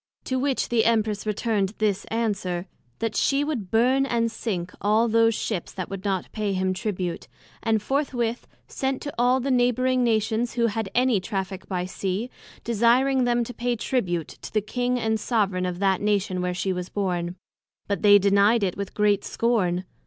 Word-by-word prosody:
To 260 0 -1
which 275 0 0
the 235 -2 +3
Empress 215 -2 +1
returned 210 -1 0
this 210 -3 0
answer, 195 -6 -2 0.3
That 225 -1 -2
she 275 +1 +2
would 260 -11 -3
burn 255 +5 +3
and 230 -2 0
sink 180 -7 -4
all 215 +3 +3
those 230 0 +3
Ships 205 -6 -3
that 185 -2 -5
would 195 -1 -5
not 195 -3 -2
pay 210 -2 -2
him 185 0 0
Tribute; 185 -4 -3 0.3
and 220 -2 +1
forthwith 245 -3 -1 0.2
sent 265 0 -2
to 285 - -5
all 250 +2 +4
the 270 +2 -1
Neighbouring 255 +1 +2
Nations, 225 0 +1
who 235 -1 +1
had 220 -2 -1
any 250 -4 +3
Traffick 190 -2 -4
by 180 -2 -2
Sea, 195 +6 -3 0.3
desiring 245 +4 +3
them 240 0 +2
to 245 - -7
pay 245 0 -1
Tribute 185 - -1
to - - -10
the 215 - +2
King 245 +4 -1
and 220 -1 0
soveraign 200 -5 0
of 180 -1 -3
that 195 -1 +1
Nation 200 -3 0
where 180 0 -1
she 190 +1 -1
was 180 0 -5
born; 180 -3 -2 0.5
But 200 - -1
they 205 -1 +8
denied 200 +3 +4
it 185 -2 0
with 200 -1 -6
great 205 -1 +2
scorn. 190 -7 0
215 Hz, 180 wpm, -25 LUFS, 195-240 Hz, 0.5 s, they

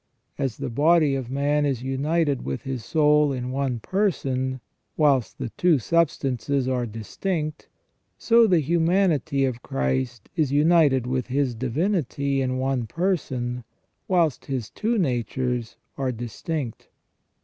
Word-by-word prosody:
As 135 -4 -1
the - - -4
body 155 +3 +4
of 130 -3 -3
man 145 +2 +1
is 135 -4 -1
united 140 +2 0
with 70 0 -4
his 130 -4 -4
soul 150 0 +3
in 125 -1 -3
one 130 -3 -1
person, 130 - -1 0.4
whilst 140 -6 +2
the - - -4
two 175 +5 +3
substances 140 -2 0
are 125 -2 0
distinct, 150 - -4 0.5
so 230 -1 +5
the 180 -5 +4
humanity 160 -3 +2
of 125 -2 -3
Christ 100 - -2
is 155 -6 +1
united 145 -4 +4
with 130 0 -2
His 130 -1 0
divinity 140 - -1
in 130 -1 -1
one 130 -3 -1
person, 130 - -2 0.4
whilst 170 -6 +1
His 125 -7 -4
two 225 - -1
natures 125 - -1 0.2
are 130 -2 0
distinct. 120 +3 -5
135 Hz, 130 wpm, -24 LUFS, 125-155 Hz, 0.5 s, so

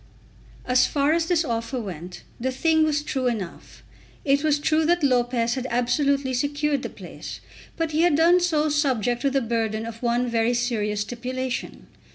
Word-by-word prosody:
As 255 0 +4
far 285 +1 +2
as 330 0 +1
this 340 -3 +2
offer 230 0 -2
went, 180 -4 -7 0.2
the 260 +2 -1
thing 315 +4 +2
was 295 -1 +1
true 265 -4 -1
enough. 205 -8 -5 0.4
It 280 +1 +2
was 300 -1 +3
true 310 +2 +1
that 345 -1 +2
Lopez 245 -3 +2
had 260 0 -3
absolutely 260 +3 +1
secured 285 +2 0
the - - -5
place. - - -9 0.4
But 330 -1 -1
he 310 +1 +1
had 345 -3 +4
done 340 +3 +5
so 315 -4 +1
subject 255 -6 +1
to 280 - +2
the 275 0 +1
burden 225 -2 -1
of 230 0 -8
one 240 0 +1
very 230 +1 +1
serious 215 -4 -1
stipulation. 250 +3 -4
260 Hz, 175 wpm, -24 LUFS, 235-300 Hz, 0.4 s, done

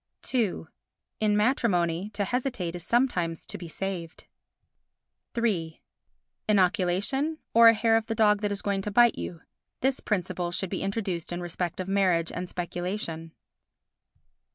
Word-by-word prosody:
ii 225 -10 +1 0.6
In 210 -1 +2
matrimony, 200 -6 +1
to 200 - 0
hesitate 245 -8 -2
is 175 - -5
sometimes 180 -9 0
to - - -6
be 175 - -7
saved. 175 -1 -5 1.1
iii 180 -9 0 0.7
Inoculation, 205 - +2 0.2
or 230 0 +8
a 230 - +8
hair 225 +1 +3
of 225 0 +1
the 225 - -2
dog 210 -2 +4
that 205 -1 0
is 200 - -3
going 200 -1 0
to 210 - -3
bite 240 +3 +5
you—this 245 +9 -4
principle 180 -3 -2
should 180 +1 -3
be 190 - -2
introduced 195 -5 -2
in 175 - -3
respect 175 0 -3
of 185 - -3
marriage 185 -4 +2
and 180 0 -5
speculation. 175 -2 -4
195 Hz, 140 wpm, -27 LUFS, 175-225 Hz, 1.1 s, or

